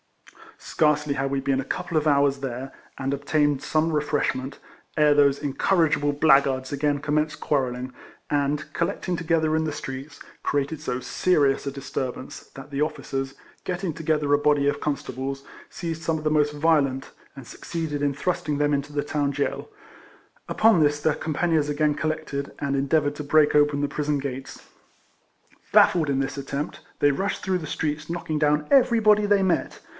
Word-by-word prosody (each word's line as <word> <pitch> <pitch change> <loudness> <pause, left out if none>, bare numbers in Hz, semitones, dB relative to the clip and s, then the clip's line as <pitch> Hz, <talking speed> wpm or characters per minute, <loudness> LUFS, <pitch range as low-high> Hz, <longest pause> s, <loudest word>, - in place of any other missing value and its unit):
Scarcely 150 -1 +1
had 135 0 -1
we 140 - 0
been 135 0 0
a 135 - -3
couple 175 +4 -4
of 155 0 +1
hours 140 -1 +3
there, 135 0 -5 0.3
and 135 +1 -2
obtained 145 0 +1
some 160 +1 +1
refreshment, 145 -3 -1 0.4
ere 150 -1 +5
these 140 -1 +4
incorrigible 145 +1 +1
blackguards 135 -3 +3
again 145 0 0
com 150 +1 -2
menced 150 0 0
quarrelling, 130 -3 -1 0.4
and, 145 +1 -1
collecting 175 +1 -1
together 160 -2 +1
in 160 - +1
the 155 - -2
streets, 135 +1 -7 0.2
created 145 +2 -1
so 125 - -3
serious 140 -1 +1
a - - -1
disturbance 130 -1 -6
that 135 +1 -10
the 140 +1 -2
officers, 135 -3 -3 0.3
getting 180 -2 -3
together 150 -2 0
a - - +6
body 145 -1 +2
of 145 - 0
constables, 135 -1 -4 0.3
seized 165 -2 -5
some 165 -1 0
of 155 - -7
the 155 - +1
most 150 -1 +2
violent 145 -4 +1 0.2
and 135 -3 -10
succeeded 155 +2 -5
in 140 -1 +1
thrusting 170 0 -2
them 145 0 +2
into 140 +1 -2
the 145 0 -1
town 145 -1 -1
jail; 145 - -3 0.8
upon 220 -5 +4
this 145 0 +2
their 150 0 +1
companions 155 -1 0
again 150 0 +1
collected, 155 -2 -3
and 140 -1 -1
endeavoured 145 +1 +1
to 150 - -5
break 150 +1 +3
open 145 -1 +3
the 145 - +1
prison 150 0 -1
gates. 135 -1 -6 1.0
Baffled 160 -5 +5
in 135 -1 +1
this 135 +1 -2
attempt, 140 +2 -4 0.2
they 145 - +4
rushed 195 +8 -2
through 185 -2 0
the 155 - -7
streets 155 +1 -3
knocking 165 -2 -3
down 150 0 +2
every 250 -4 +5
body 210 -1 +4
they 200 -1 +3
met. 180 -3 0
145 Hz, 170 wpm, -24 LUFS, 140-155 Hz, 1.0 s, a